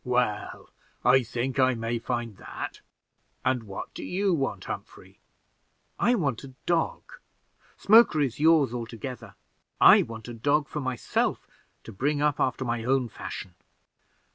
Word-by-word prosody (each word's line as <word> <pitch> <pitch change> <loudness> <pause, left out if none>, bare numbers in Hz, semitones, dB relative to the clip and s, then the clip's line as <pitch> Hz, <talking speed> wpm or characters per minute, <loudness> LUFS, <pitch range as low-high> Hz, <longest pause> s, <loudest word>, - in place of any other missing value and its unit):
"Well, 125 -4 -1 0.3
I 130 +2 +6
think 125 +3 -3
I 130 -1 +4
may 115 +1 -2
find 120 -3 -4
that. - - -7 0.6
And 125 -3 +1
what 100 -2 -7
do - - -7
you 195 +1 0
want, 135 -4 -2
Humphrey?" - - -8 0.8
"I 245 - +3
want 140 - -1
a 130 -2 -11
dog. 170 -2 0 0.7
Smoker 215 -6 +6
is 135 -3 -1
yours 155 -5 +4
altogether; 115 -2 -7 0.4
I - - +8
want 110 -1 -7
a 120 - -6
dog 140 +5 +1
for 150 - -5
myself, 130 -2 -1 0.4
to - - -9
bring 140 +8 -1
up 150 -1 +1
after 130 0 0
my 120 -1 -2
own 130 0 +1
fashion." 95 -3 -7
130 Hz, 140 wpm, -27 LUFS, 115-145 Hz, 0.8 s, I